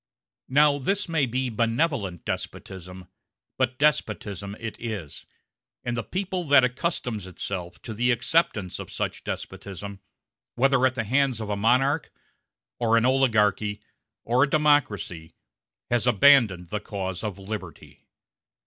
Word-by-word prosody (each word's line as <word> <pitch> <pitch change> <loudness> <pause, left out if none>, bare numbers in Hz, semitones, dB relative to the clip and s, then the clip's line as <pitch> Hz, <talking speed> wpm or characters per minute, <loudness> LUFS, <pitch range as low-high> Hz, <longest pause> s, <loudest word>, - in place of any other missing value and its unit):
Now 145 +1 +4
this 195 +9 0
may 160 -5 +1
be 125 +1 -1
benevolent 115 - 0
despotism, 90 -1 -6 0.5
but 130 +2 +1
despotism 105 -8 0
it 115 -1 -6
is; 105 -10 -6 0.6
and 120 -1 -2
the 115 - -1
people 185 - -3
that 140 -3 +6
accustoms 125 - -2
itself 90 -1 -6
to 115 - -6
the 120 +4 +1
acceptance 120 - +1
of - - -8
such - - -3
despotism, 100 0 -6 0.6
whether 135 +1 +3
at 130 - -4
the 115 - -1
hands 130 +1 +1
of 110 -2 -4
a - - 0
monarch, 130 +8 +2 0.7
or 115 -1 +3
an 115 - +3
oligarchy, 105 -5 +2 0.4
or 120 +2 +2
a 145 - +1
democracy, 115 - +1 0.6
has 120 0 +2
abandoned 115 -8 +5
the 105 - -2
cause 95 -3 -5
of 105 -3 -3
liberty. 100 +2 -8
115 Hz, 130 wpm, -26 LUFS, 100-135 Hz, 0.7 s, that